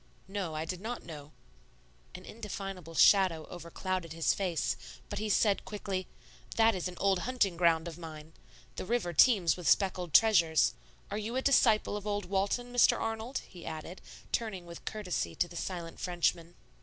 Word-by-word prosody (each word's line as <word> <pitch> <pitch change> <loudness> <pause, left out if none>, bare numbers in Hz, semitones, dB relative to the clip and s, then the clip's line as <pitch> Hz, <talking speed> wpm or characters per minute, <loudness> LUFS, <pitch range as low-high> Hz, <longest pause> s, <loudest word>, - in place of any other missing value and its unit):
"No, 190 -5 -4
I 155 +1 -2
did 180 +2 -5
not 235 +3 -5
know;" 150 -3 -9 0.8
an 185 - -9
indefinable 195 -6 -7
shadow 180 -4 +5
over 170 -1 -9
clouded 185 -2 -3
his 165 0 +2
face, 180 -5 -1 0.3
but 205 - -4
he 215 0 -2
said 205 -1 +3
quickly, 195 -3 -4 0.5
"That 225 0 +5
is 185 -2 -2
an 180 -1 -8
old 195 -2 +2
hunting 215 -4 0
ground 170 -1 +3
of 170 0 -8
mine. 160 -1 -9 0.4
The - - -4
river 220 -7 0
teems 190 - +5
with 180 -3 -1
speckled 185 -4 +2
treasures. 170 -6 +5 0.4
Are 205 - -2
you 220 +3 -4
a 260 - 0
disciple 225 -7 +4
of 205 0 -7
old 205 0 -1
Walton, 200 +6 -1
Mr. 245 - +5
Arnold?" 225 +3 -3
he 175 - -12
added, 160 +3 -7 0.3
turning 205 -6 -2
with 170 0 -11
courtesy 180 - -3
to 175 - +1
the 175 - -13
silent 170 -1 -5
Frenchman. 175 -1 -1
185 Hz, 170 wpm, -31 LUFS, 170-210 Hz, 0.8 s, shadow